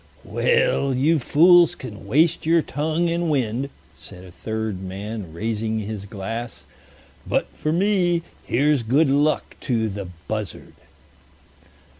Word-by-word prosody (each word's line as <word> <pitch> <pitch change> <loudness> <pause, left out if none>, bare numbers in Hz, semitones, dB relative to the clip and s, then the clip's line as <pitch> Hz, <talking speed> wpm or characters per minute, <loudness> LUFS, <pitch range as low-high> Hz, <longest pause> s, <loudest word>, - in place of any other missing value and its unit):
"Well, 475 - +1
you 155 +5 +3
fools 175 +5 +5
can 115 -9 -9
waste 160 +4 +3
your 165 -1 +4
tongue 155 +4 -1
and 170 0 0
wind," 130 -1 0 0.3
said 90 - -12
a 90 - -12
third 110 -1 -4
man, 100 0 -6
raising 110 +5 -2
his 105 -1 -5
glass, 115 +4 -6 0.6
"but - - 0
for 155 - -2
me 175 -1 +2 0.2
here's 145 +1 +2
good 135 +6 +3
luck 145 +2 +1
to 115 -4 0
the 100 -1 -5 0.2
Buzzard." 105 -4 -5
130 Hz, 125 wpm, -23 LUFS, 110-160 Hz, 0.6 s, fools